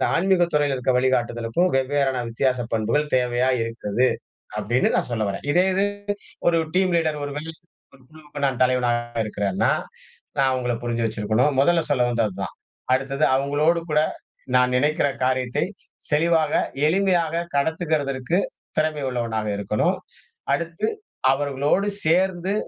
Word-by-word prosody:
ஆன்மீகத் 175 -2 +2
துறையில 145 -2 +2
இருக்கிற 130 0 0
வழிகாட்டுதலுக்கும் 120 +4 +1
வெவ்வேறான 135 -1 +1
வித்தியாச 125 +2 0
பண்புகள் 115 +7 0
தேவையா 125 0 +1
இருக்குது, 115 +1 0 0.5
அப்டின்னு 120 +4 +1
நான் - - -1
சொல்ல 110 -2 0
வர்றேன். 100 +7 -5
இதே 180 +3 +4
இது 195 +1 +2 0.7
ஒரு 165 -1 +2 0.2
டீம் 185 -1 +3
லீடர், 155 -2 0
ஒரு 145 - -5
வேள 150 +2 -5 0.5
ஒரு 135 - -21
குழுவுக்கு 150 -2 -10
நான் 130 -2 -1
தலைவனா 125 -1 +3 0.3
இருக்கேன்னா 100 -3 0 0.7
நான் 135 -1 +3
அவங்கள 125 -2 -1
புரிஞ்சு 120 -1 -1
வச்சிருக்கணும். 110 +6 +1
முதல்ல 165 +4 +4
சொல்ல 135 -4 +2
வந்ததுதான். 105 -5 -2 0.4
அடுத்தது 135 +2 0
அவங்களோடு 145 +5 +2
கூட 150 0 +3 0.6
நான் 125 0 +4
நெனக்கிற 145 +3 +2 0.2
காரியத்தை, 130 0 0 0.5
தெளிவா, 160 +2 +3 0.4
எளிமையா 185 0 +3 0.3
கடத்துகதற்கு 150 -1 0 0.4
திறமை 155 -2 0
உள்ளவனா 115 -3 -2 0.2
இருக்கணும். 100 +1 0 0.6
அடுத்து 170 +8 -2 0.4
அவர்களோடு 145 +7 +1 0.2
சேர்ந்து 180 +3 +2
135 Hz, 125 wpm, -23 LUFS, 120-155 Hz, 0.7 s, இதே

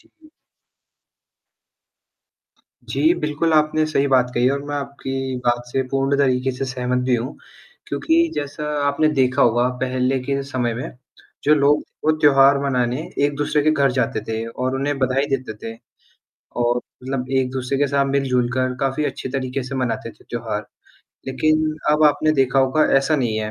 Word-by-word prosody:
जी। 320 -1 -24 2.6
जी, 325 +2 +3
बिल्कुल 150 +2 0
आपने 155 0 +3
सही 140 -2 +1
बात 125 -2 +3
कही 125 +1 +3
और 140 0 -2
मैं 145 0 -4
आपकी 135 -2 -4
बात 120 0 +2
से 130 +2 -1
पूर्ण 135 +1 +1
तरीके 130 -1 +2
से 130 - -3
सहमत 125 -1 -2
भी 125 - +3
हूँ 125 +5 -5 0.5
क्योंकि 335 +1 +1
जैसा 145 +1 -4 0.2
आपने 155 +2 +2
देखा 130 0 +2
होगा 120 +1 +3
पहले 130 +1 0
के 140 0 -1
समय 125 -4 -2
में 125 - -5 0.5
जो 150 - +5
लोग 145 0 +3
थे - - -26 0.2
वो 155 - +4
त्योहार 140 -1 +6
मनाने 125 -1 0 0.2
एक-दूसरे 145 +1 0
के 155 - +3
घर 140 -3 +2
जाते 125 -3 0
थे 110 0 -2
और 130 +3 -3
उन्हें 140 +1 -1
बधाई 130 +2 +1
देते 130 -4 -5
थे 115 0 -6 0.9
और 120 0 +2
मतलब 130 +1 -6
एक-दूसरे 130 0 -1
के 145 0 +2
साथ 140 0 +1
मिलजुल 125 -3 +1
कर 130 0 0
काफ़ी 135 +2 0
अच्छे 135 -1 -4
तरीके 130 0 -3
से 130 +2 -6
मनाते 125 -3 -2
थे - - -23
त्योहार, - - -4 0.6
लेकिन 155 +3 +1 0.2
अब 155 +1 +2
आपने 150 +1 +3
देखा 135 -2 +2
होगा 135 +4 +3
ऐसा 145 +3 +2
नहीं 120 -6 0
है, 110 0 -3
135 Hz, 165 wpm, -21 LUFS, 125-145 Hz, 2.6 s, त्योहार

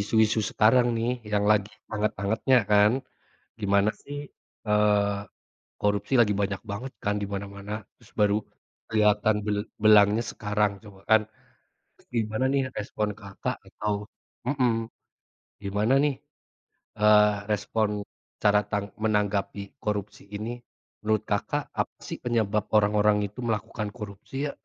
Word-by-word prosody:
isu-isu 110 +1 +3
sekarang 120 +3 +4
nih, 115 +2 0 0.2
yang 105 0 +2
lagi 105 0 +2 0.2
hangat-hangatnya 105 +4 +1
kan. 105 0 +6 0.7
Gimana 100 +1 +3
sih, 145 0 -7 0.5
eee, 105 -1 +3 0.6
korupsi 105 +4 0
lagi 105 -2 +3
banyak 100 -1 -2
banget 125 +6 -5
kan 105 0 +1
di - - -1
mana-mana. 100 +1 -6 0.3
Terus - - -21
baru 105 0 +4 0.5
kelihatan 105 -1 +3
bel 105 -1 0 0.3
belangnya 105 +1 +6
sekarang 105 0 0
coba 100 -2 -14
kan. 110 0 +7 0.7
Terus - - -27
gimana 110 +3 0
nih, 140 - +3 0.2
respon 105 0 -2
Kakak 100 -1 -4
atau 105 -1 -2 0.5
mhm. 130 -3 +2 0.9
Gimana 105 +6 +1
nih, 145 - +2 0.9
eee, 105 0 +6 0.2
respon, 105 +1 0 0.5
cara 105 0 +5
tang 100 -1 0 0.2
menanggapi 105 -2 0 0.2
korupsi 105 -1 -3
ini? 110 +3 -4 0.5
Menurut 110 -1 +1
Kakak, - - 0 0.2
apa - - -1
sih - - -4
penyebab 110 -4 +1
orang-orang 105 0 +4
itu 105 - -14
melakukan 105 -1 -2
korupsi 100 +3 -9
ya? - - -3
105 Hz, 125 wpm, -27 LUFS, 100-110 Hz, 0.9 s, kan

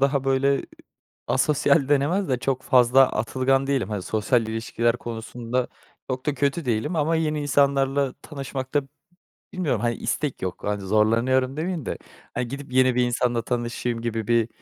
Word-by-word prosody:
daha, 140 0 +2
böyle, 135 +1 +2 0.6
asosyal 150 -1 +2
denemez 145 +7 +2
de, 130 - +1
çok 130 0 -1
fazla 130 +1 +5
atılgan 130 +4 +1
değilim. 135 -8 0
Hani, 105 -4 -3
sosyal 110 +3 +1
ilişkiler 115 +1 0
konusunda 120 +2 -4 0.4
çok 130 +2 -3
da 145 - +1
kötü 140 +3 0
değilim 120 +8 -1
ama 160 +2 +2
yeni 155 -2 -1
insanlarla 140 -1 +2
tanışmakta 140 -1 -3 0.7
bilmiyorum. 150 - -1
Hani, 120 +1 0
istek 150 -3 -3
yok, 95 -1 -4
hani, 105 0 -1
zorlanıyorum 115 +7 +2
demiyim 165 -2 -3
de, - - -3 0.4
aaa, 120 - -1
gidip, 135 +2 -7
yeni 130 -1 +4
bir 125 - +3
insanla 120 -1 0
tanışayım 120 -1 -2
gibi 115 -2 -3
bir 115 -1 +2
130 Hz, 150 wpm, -24 LUFS, 120-140 Hz, 0.7 s, fazla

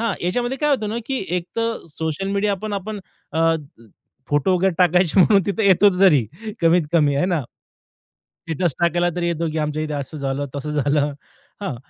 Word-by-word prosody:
हां, 225 -5 0
याच्यामध्ये 245 +8 -1
काय 295 +2 +1
होतं 240 -7 +1
ना, 225 - -2
की 265 -7 -2
एकतर 230 +6 -3
सोशल 160 +4 -2
मीडियापण 205 +1 -1
आपण 205 +1 -4 0.3
अ, 165 0 +3 0.8
फोटो 145 +6 +2
वगैरे 190 -1 +1
टाकायचे 180 0 +3
म्हणून 195 +1 +5
तिथे 205 +1 0
येतो 195 +1 +6
तरी 150 - +5 0.4
कमीत-कमी 165 -3 +3
आहे 145 - +1
ना. 175 -4 0 1.0
स्टेटस 170 +1 -1
टाकायला 175 +1 +2
तरी 175 -1 -1
येतो, 170 -1 -1
की 160 - -4
आमच्या 150 0 -2
इथे 155 -1 -4
असं 145 +1 -5
झालं, 140 0 -2
तसं 145 +2 -4
झालं. 145 0 +1 0.5
हां 195 -10 -3
175 Hz, 165 wpm, -21 LUFS, 150-200 Hz, 1.0 s, येतो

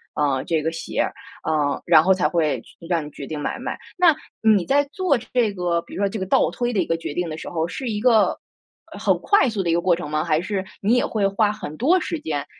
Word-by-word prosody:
呃， 140 -3 +1
这 160 -3 0
个 160 - 0
鞋 165 - -3
儿， - - -4 0.3
呃， 145 -2 0
然 160 -2 +6
后 190 +1 +5
才 180 -5 +1
会 155 -3 0 0.3
让 165 -4 0
你 - - -8
决 140 - -8
定 155 -2 -5
买 - - -3
不 - - -10
买， - - -4 0.2
那 340 -4 +5 0.3
你 215 -5 +4
在 285 +1 +3
做 365 -8 +2
这 230 -3 0
个 175 -2 0
比 - - -15
如 200 - -4
说， 200 - +3
这 220 - -5
个 190 - -2
倒 175 - +3
推 240 +4 -2
的 205 - 0
一 - - +2
个 165 - +1
决 165 - -6
定 175 0 -2
的 155 - -5
时 - - -7
候， 165 -1 -1
是 250 +6 -5
一 210 -1 -2
个 225 -3 +3 0.5
呃， - - -9
很 - - +2
快 340 - +3
速 210 -3 -2
的 170 - -1
一 - - +3
个 170 - +2
过 175 -1 +3
程 170 -4 -6
吗？ 155 0 0
还 160 -1 +1
是 190 0 -3 0.2
你 210 +4 +2
也 - - +2
会 205 -3 0
花 205 +1 +2
很 155 -8 -7
多 335 +10 +3
时 335 -3 -3
间 145 - -3
180 Hz, 290 characters per minute, -22 LUFS, 160-225 Hz, 0.5 s, 然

